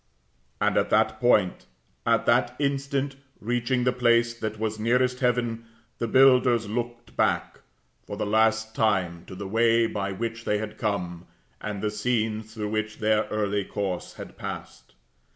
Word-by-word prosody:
And -, -, +2 dB
at -, -, +2 dB
that -, -, +2 dB
point, 105 Hz, -7 st, +2 dB, 0.4 s
and -, -, +3 dB
that -, -, +2 dB
instant, 140 Hz, -1 st, -1 dB, 0.2 s
reaching 120 Hz, +3 st, 0 dB
the 125 Hz, -, +3 dB
place 120 Hz, -1 st, +3 dB
that 110 Hz, -2 st, -5 dB
was 110 Hz, 0 st, -2 dB
nearest 125 Hz, +3 st, +2 dB
heaven, 120 Hz, -2 st, 0 dB, 0.3 s
the 115 Hz, -, -1 dB
builders 125 Hz, -3 st, +5 dB
looked 120 Hz, +2 st, -5 dB
back, -, -, 0 dB, 0.5 s
for -, -, -6 dB
the -, -, -1 dB
last 110 Hz, +1 st, +2 dB
time, 95 Hz, -7 st, 0 dB
to -, -, -10 dB
the 100 Hz, +1 st, -6 dB
way 115 Hz, +2 st, +3 dB
by 100 Hz, -3 st, -2 dB
which 115 Hz, +3 st, -4 dB
they 105 Hz, -, +1 dB
had 110 Hz, 0 st, -6 dB
come, 90 Hz, -5 st, -3 dB, 0.3 s
and 105 Hz, -1 st, -5 dB
the 105 Hz, -, 0 dB
scenes 110 Hz, -1 st, -1 dB
through 105 Hz, -1 st, -3 dB
which 110 Hz, 0 st, -2 dB
their 110 Hz, 0 st, +2 dB
early 105 Hz, -1 st, -1 dB
course 95 Hz, -3 st, -4 dB
had -, -, -10 dB
passed. 60 Hz, -1 st, -8 dB
110 Hz, 155 wpm, -26 LUFS, 105-120 Hz, 0.5 s, builders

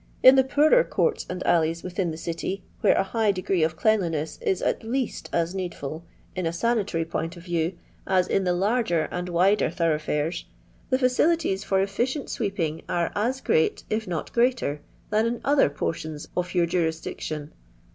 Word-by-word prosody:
In 260 Hz, -, +10 dB
the 265 Hz, -, +6 dB
poorer 305 Hz, -, +4 dB
courti 470 Hz, -2 st, 0 dB
and 180 Hz, 0 st, -4 dB
alleys 165 Hz, -1 st, +2 dB
within 180 Hz, 0 st, -2 dB
the 160 Hz, -, -5 dB
city, 170 Hz, +4 st, -4 dB, 0.2 s
where -, -, +4 dB
a -, -, +3 dB
high 215 Hz, +1 st, +1 dB
degree 185 Hz, -1 st, -1 dB
of 160 Hz, 0 st, +1 dB
cleanliness 165 Hz, -6 st, 0 dB
is, 190 Hz, -, 0 dB
at -, -, 0 dB
least, 250 Hz, +2 st, -3 dB
as 170 Hz, +1 st, 0 dB
needful, 170 Hz, -4 st, -5 dB, 0.3 s
in 180 Hz, -3 st, -1 dB
a -, -, 0 dB
sanitary 200 Hz, -3 st, 0 dB
point 165 Hz, +1 st, -4 dB
of 170 Hz, -, -11 dB
view, 170 Hz, 0 st, -1 dB, 0.3 s
as 185 Hz, -1 st, +3 dB
in 195 Hz, -, +1 dB
the 180 Hz, -1 st, +1 dB
larger 200 Hz, -3 st, +1 dB
and 180 Hz, 0 st, -3 dB
wider 185 Hz, +4 st, +3 dB
thorough 165 Hz, -3 st, +1 dB
fiires, 150 Hz, +2 st, -2 dB, 0.4 s
the 260 Hz, -, +3 dB
£Eu^lities 255 Hz, -, +2 dB
for 195 Hz, -1 st, +1 dB
efficient 245 Hz, +8 st, -2 dB
sweeping 170 Hz, -7 st, -2 dB
are 170 Hz, -1 st, 0 dB
as 245 Hz, +6 st, 0 dB
grea^ 160 Hz, -, +1 dB
if 215 Hz, 0 st, -1 dB
not 170 Hz, -3 st, -4 dB
greater, 235 Hz, -, +1 dB, 0.3 s
than 215 Hz, +2 st, +3 dB
in 235 Hz, 0 st, -3 dB
other 280 Hz, -, +4 dB
portions 155 Hz, +1 st, -4 dB
oH 180 Hz, 0 st, 0 dB
your 175 Hz, -1 st, +4 dB
jurisdiction. 160 Hz, -3 st, -3 dB
180 Hz, 175 wpm, -25 LUFS, 165-220 Hz, 0.4 s, In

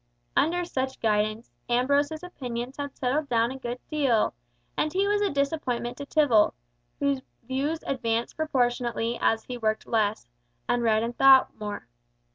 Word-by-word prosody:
Under 350 Hz, +4 st, +2 dB
such 265 Hz, -5 st, -3 dB
guidance, 215 Hz, -, 0 dB, 0.2 s
Ambrose's 285 Hz, +6 st, +1 dB
opinions 250 Hz, -7 st, -5 dB
had 285 Hz, -1 st, -5 dB
settled 280 Hz, +3 st, 0 dB
down 235 Hz, 0 st, +2 dB
a 265 Hz, -, -7 dB
good 240 Hz, -1 st, -4 dB
deal; 270 Hz, -8 st, +2 dB, 0.4 s
and 305 Hz, -, 0 dB
he 385 Hz, +4 st, +1 dB
was 410 Hz, 0 st, +2 dB
a 405 Hz, -, +2 dB
disappointment 275 Hz, -4 st, -1 dB
to 285 Hz, -, -7 dB
Tibble, 270 Hz, -10 st, +4 dB, 0.4 s
whose 280 Hz, -2 st, +1 dB, 0.2 s
views 275 Hz, +6 st, -2 dB
advanced 235 Hz, -3 st, -1 dB
proportionably 245 Hz, -5 st, 0 dB
as 225 Hz, 0 st, +2 dB
he 250 Hz, -1 st, -6 dB
worked 215 Hz, -1 st, 0 dB
less, 215 Hz, -, 0 dB, 0.4 s
and 245 Hz, -, +1 dB
read 220 Hz, -1 st, +3 dB
and 235 Hz, +1 st, -3 dB
thought 270 Hz, 0 st, +6 dB
more. 205 Hz, -, -5 dB
255 Hz, 150 wpm, -27 LUFS, 230-285 Hz, 0.4 s, thought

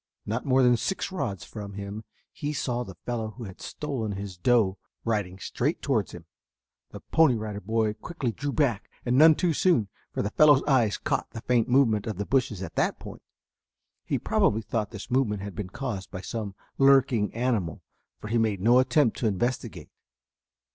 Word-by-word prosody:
Not 115 Hz, +6 st, -3 dB
more 130 Hz, 0 st, +4 dB
than 125 Hz, -1 st, +5 dB
six 195 Hz, +8 st, -2 dB
rods 105 Hz, -, -3 dB
from 105 Hz, -2 st, -8 dB
him 100 Hz, +2 st, -6 dB, 0.3 s
he 145 Hz, +1 st, -4 dB
saw 125 Hz, -3 st, -1 dB
the 95 Hz, -6 st, -10 dB
fellow 110 Hz, -3 st, -3 dB
who 120 Hz, -, -7 dB
had 95 Hz, -4 st, -10 dB
stolen 130 Hz, -8 st, -4 dB
his 100 Hz, -1 st, -6 dB
doe 100 Hz, 0 st, +2 dB, 0.3 s
riding 105 Hz, -5 st, -1 dB
straight 135 Hz, -, -2 dB
towards 115 Hz, -9 st, 0 dB
him. 85 Hz, -1 st, -10 dB, 0.6 s
The -, -, -10 dB
Pony 160 Hz, -6 st, +3 dB
Rider 105 Hz, -2 st, -4 dB
Boy 110 Hz, +1 st, 0 dB
quickly 130 Hz, +1 st, -4 dB
drew 145 Hz, +5 st, -4 dB
back 130 Hz, -9 st, 0 dB, 0.2 s
and 125 Hz, 0 st, +1 dB
none 155 Hz, +3 st, +8 dB
too 175 Hz, -1 st, +1 dB
soon, 140 Hz, -, +2 dB, 0.2 s
for -, -, -2 dB
the 105 Hz, -, -2 dB
fellow's 145 Hz, -3 st, +6 dB
eyes 125 Hz, -8 st, +2 dB
caught -, -, -2 dB
the 115 Hz, -, -8 dB
faint 120 Hz, 0 st, +1 dB
movement 115 Hz, -5 st, +3 dB
of 110 Hz, -4 st, -3 dB
the 100 Hz, -, -2 dB
bushes 125 Hz, -7 st, 0 dB
at -, -, -7 dB
that -, -, +1 dB
point. -, -, -10 dB, 0.8 s
He -, -, -1 dB
probably 110 Hz, +2 st, +1 dB
thought 105 Hz, -2 st, -2 dB
this 105 Hz, +2 st, -9 dB
movement 110 Hz, -6 st, +1 dB
had 100 Hz, -1 st, -6 dB
been 105 Hz, -4 st, -5 dB
caused 105 Hz, -3 st, -5 dB
by 95 Hz, -, -7 dB
some 105 Hz, -2 st, -5 dB, 0.2 s
lurking 135 Hz, -6 st, +4 dB
animal, 115 Hz, -9 st, -1 dB, 0.3 s
for 105 Hz, -, -8 dB
he 115 Hz, +1 st, +2 dB
made 110 Hz, -3 st, +1 dB
no 120 Hz, +6 st, +5 dB
attempt 130 Hz, -1 st, +3 dB
to 115 Hz, -, 0 dB
investigate. 115 Hz, +5 st, -2 dB
115 Hz, 185 wpm, -27 LUFS, 105-130 Hz, 0.8 s, none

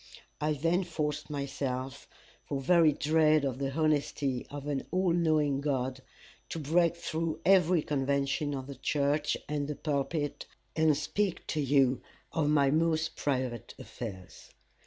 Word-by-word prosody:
I 150 Hz, +1 st, +1 dB
then 165 Hz, +6 st, +1 dB
forced 155 Hz, -4 st, -3 dB
myself, 135 Hz, -2 st, -4 dB, 0.4 s
for 140 Hz, -, -3 dB
very 165 Hz, +3 st, +5 dB
dread 155 Hz, 0 st, +3 dB
of 130 Hz, -1 st, -2 dB
the 135 Hz, -1 st, -1 dB
honesty 145 Hz, -3 st, 0 dB
of 145 Hz, -1 st, -7 dB
an 145 Hz, -2 st, -2 dB
all 185 Hz, 0 st, +1 dB
knowing 155 Hz, -5 st, +2 dB
God, 130 Hz, -2 st, -1 dB, 0.5 s
to -, -, -4 dB
break 165 Hz, +3 st, +2 dB
through 165 Hz, -1 st, -3 dB
every 180 Hz, -4 st, +5 dB
convention 140 Hz, +1 st, 0 dB
of 130 Hz, -1 st, -5 dB
the 140 Hz, -, -7 dB
church 145 Hz, +1 st, 0 dB
and 145 Hz, -1 st, -2 dB
the 150 Hz, -, -3 dB
pulpit, 145 Hz, +1 st, -2 dB, 0.3 s
and 155 Hz, -2 st, +3 dB
speak 185 Hz, +5 st, -1 dB
to 155 Hz, -, 0 dB
you 135 Hz, -2 st, +3 dB, 0.3 s
of 150 Hz, -2 st, +1 dB
my 140 Hz, -2 st, +4 dB
most 160 Hz, +1 st, +1 dB
private 125 Hz, -4 st, -2 dB
affairs. 95 Hz, -6 st, -9 dB
145 Hz, 140 wpm, -30 LUFS, 140-160 Hz, 0.5 s, very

